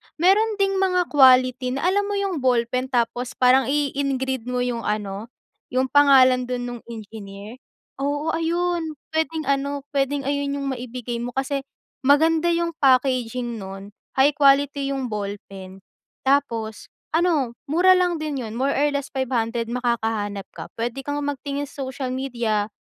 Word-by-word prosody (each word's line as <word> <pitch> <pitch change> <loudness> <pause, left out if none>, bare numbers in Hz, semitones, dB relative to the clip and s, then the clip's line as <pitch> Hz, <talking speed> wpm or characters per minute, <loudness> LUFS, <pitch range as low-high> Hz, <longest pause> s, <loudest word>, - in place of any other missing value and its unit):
Meron 410 +6 +3
ding 390 -1 +1
mga 365 -2 +1
quality, 255 -2 +5
na 275 - -3
alam 405 +2 +1
mo 410 - -2
'yung 390 -6 -1
ballpen 255 0 +1
tapos 245 0 -1
parang 255 +1 +4
i-i-engrave 270 -3 -1
mo 250 0 -1
'yung 240 -2 -3
ano, 210 0 -3 0.4
'yung 260 +1 0
pangalan 260 -3 +5
dun 250 -1 -3
nung 240 -1 -7
engineer. 215 0 -9 0.4
Oo, 290 +3 -1
ayun, 335 -1 -1 0.2
puwedeng 320 0 -1
ano, 280 0 -1
puwedeng 280 0 0
ayun 280 0 -1
'yung 280 -1 -3
maibigay 245 -1 -5
mo, 245 +1 -5
kasi 270 +1 -1 0.4
maganda 315 +5 +3
'yung 340 0 +1
packaging 250 -3 +1
nun, 195 +1 -8 0.2
high 270 +2 +5
quality 280 -1 +3
'yung 260 -3 -4
ballpen, 195 -2 -7 0.4
tapos 230 -6 0 0.2
ano 310 -8 +1
mura 360 +5 +5
lang 360 -1 +2
din 300 -2 -3
'yun, 220 - -7
more 270 +3 +1
or 290 +2 +2
less 280 -1 -3
5 265 -1 -2
hundred 230 0 -1
makakahanap 225 -4 -2
ka. - - -8
Puwede 240 +3 -2
kang 290 +1 -3
magtingin 285 0 -3
sa 275 0 -7
social 260 0 -4
media 235 -5 -1
265 Hz, 150 wpm, -23 LUFS, 235-290 Hz, 0.4 s, quality